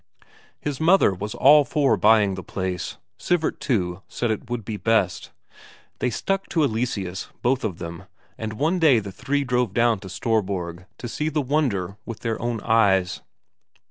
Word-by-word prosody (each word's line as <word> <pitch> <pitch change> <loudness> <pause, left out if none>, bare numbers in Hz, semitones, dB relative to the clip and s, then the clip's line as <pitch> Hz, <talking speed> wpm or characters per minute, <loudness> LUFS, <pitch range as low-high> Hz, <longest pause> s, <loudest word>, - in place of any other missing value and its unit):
His 145 -1 -4
mother 170 - +5
was 105 +3 -5
all 150 +2 +7
for 140 -3 +2
buying 105 0 +4
the 95 - -5
place; 90 0 -4 0.2
Sivert, 175 -3 0
too, 95 -8 -1
said 120 -2 -2
it 110 - -4
would 120 -3 -3
be 110 - -4
best. 105 -4 0 0.7
They 125 - +1
stuck 195 - -2
to 160 - +2
Eleseus 110 -7 -2
both 125 +1 +1
of 100 -7 -2
them, 85 -1 -7 0.3
and 110 -1 -5
one 160 +10 0
day 155 -7 +5
the 100 -3 -3
three 145 +8 -1
drove 125 -5 0
down 115 -3 +3
to 95 -1 -10
Storborg 95 -6 -2
to 120 - -6
see 150 +6 -2
the 155 0 -1
wonder 115 - 0
with 115 - -8
their 115 -2 -2
own 120 -2 -2
eyes. 100 -5 +2
115 Hz, 170 wpm, -24 LUFS, 95-135 Hz, 0.7 s, all